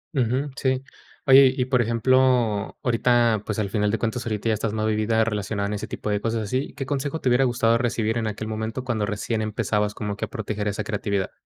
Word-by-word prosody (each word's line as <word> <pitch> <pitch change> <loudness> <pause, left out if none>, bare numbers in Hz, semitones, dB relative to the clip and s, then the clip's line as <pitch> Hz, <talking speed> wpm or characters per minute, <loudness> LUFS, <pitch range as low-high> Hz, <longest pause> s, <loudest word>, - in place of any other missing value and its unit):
Ujú. 130 +3 0
Sí. 130 0 0 0.4
Oye, 135 -1 +8
y 125 - +1
por 125 -1 +2
ejemplo, 120 -2 +2
ahorita, 120 -2 +3
pues, 105 - -3
al 100 -2 -1
final 105 -1 +1
de 115 - 0
cuentas, 115 +1 -2
ahorita 110 0 -2
ya - - +3
estás 110 0 -2
más 110 0 -1
vivida, 110 +1 +2
relacionada 105 -2 -2
en 105 - -3
ese 105 - -4
tipo 105 - -5
de 105 -1 +1
cosas, 115 -1 -1
así. 130 +7 -2
¿Qué 135 - -4
consejo 145 +3 -2
te 130 - 0
hubiera 130 +2 +4
gustado 120 -2 +2
recibir 115 -2 0
en 110 - -2
aquel 110 +1 -4
momento, 110 +3 -4
cuando 110 -5 -1
recién 110 +1 -2
empezabas 105 -1 -1
como 105 -1 -3
que - - -2
a - - -13
proteger 105 -1 -4
esa 100 - -2
creatividad? 100 -2 -2
110 Hz, 220 wpm, -24 LUFS, 105-125 Hz, 0.4 s, Oye